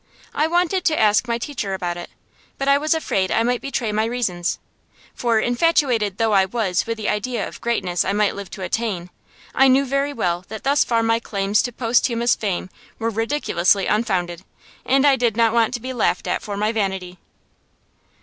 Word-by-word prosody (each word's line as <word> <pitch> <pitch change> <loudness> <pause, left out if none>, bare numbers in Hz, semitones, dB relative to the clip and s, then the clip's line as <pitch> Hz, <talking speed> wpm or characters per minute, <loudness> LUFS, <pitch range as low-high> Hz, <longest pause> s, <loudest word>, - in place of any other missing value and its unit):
I 305 - +1
wanted 355 +2 +1
to 315 -2 +2
ask 215 +3 +3
my 235 0 0
teacher 230 -6 -4
about 175 -2 -3
it, 175 - -8 0.5
but 275 - -3
I 280 - +6
was 310 +2 +1
afraid 195 -12 -1
I 225 - +2
might 245 +1 0
betray 250 -5 -2
my 215 +1 +1
reasons. 210 -8 -2 0.6
For, 235 -2 +1
infatuated 245 - +1
though 225 -1 +1
I 195 -1 +5
was 190 -3 -1
with 230 0 -2
the 215 - -4
idea 230 +4 -1
of - - -10
the - - -11
greatness 185 -7 0
I 190 - -1
might 205 0 +1
live 200 -2 -8
to 190 - -8
attain, 185 -2 -3 0.4
I 270 - +5
knew 265 +2 +4
very 275 +2 0
well 175 -9 -1
that 220 0 -8
thus 280 +2 +3
far 230 -1 +1
my 230 0 +2
claims 200 -2 0
to 245 - -3
posthumous 235 0 +1
fame 185 -3 -3 0.3
were 230 0 -2
ridiculously 215 -5 +1
unfounded, 185 -6 -1 0.4
and 270 +1 +3
I 275 -2 +5
did 235 -3 0
not 230 -1 +3
want 230 -2 +3
to - - -4
be 260 +2 -5
laughed 215 -6 0
at - - -1
for 205 -1 -5
my 210 +2 +1
vanity. 190 -4 -3
225 Hz, 200 wpm, -21 LUFS, 195-250 Hz, 0.6 s, I